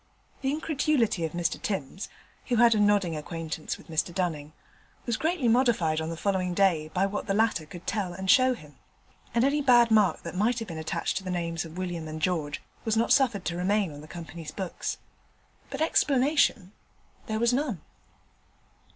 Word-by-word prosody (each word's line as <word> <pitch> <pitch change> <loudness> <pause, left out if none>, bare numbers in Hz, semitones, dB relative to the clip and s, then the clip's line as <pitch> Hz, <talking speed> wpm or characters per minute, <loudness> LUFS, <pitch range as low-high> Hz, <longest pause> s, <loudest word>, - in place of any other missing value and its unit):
The 270 - 0
incredulity 285 - +1
of 160 - -5
Mr 175 -1 -1
Timms 190 -1 -4 0.4
(who 245 - +1
had 235 0 +6
a 215 - +1
nodding 205 -5 +3
acquaintance 160 0 -5
with - - -17
Mr 160 +1 -1
Dunning) 160 -5 -2 0.5
was 235 - 0
greatly 315 -2 0
modified 225 -10 +3
on 160 - -3
the 165 - -5
following 185 -1 0
day 170 -6 +2
by 185 +4 +1
what 200 +1 -3
the 195 - +1
latter 215 -8 +1
could 175 +2 -11
tell 200 -4 -1
and 190 +2 -6
show 255 +4 +5
him; 150 - -15 0.6
and 235 - +4
any 290 +2 +2
bad 240 -4 +5
mark 210 -3 +3
that 170 - -6
might 220 +6 +1
have 225 -2 -4
been 165 -1 -5
attached 160 - -2
to 195 - -4
the 185 - -5
names 170 -2 -2
of 165 +1 -10
William 175 -3 -4
and 155 0 -6
George 155 -3 -1 0.2
was 220 -1 0
not 230 - +2
suffered 235 -9 +2
to 170 - -2
remain 190 +1 +1
on 145 - -10
the 155 - -12
Company's 165 -1 -8
books; 185 +2 -4 0.7
but - - -5
explanation 275 - +2 0.6
there 220 -1 -1
was 235 +2 +2
none. 250 - -1
190 Hz, 185 wpm, -27 LUFS, 165-235 Hz, 0.7 s, had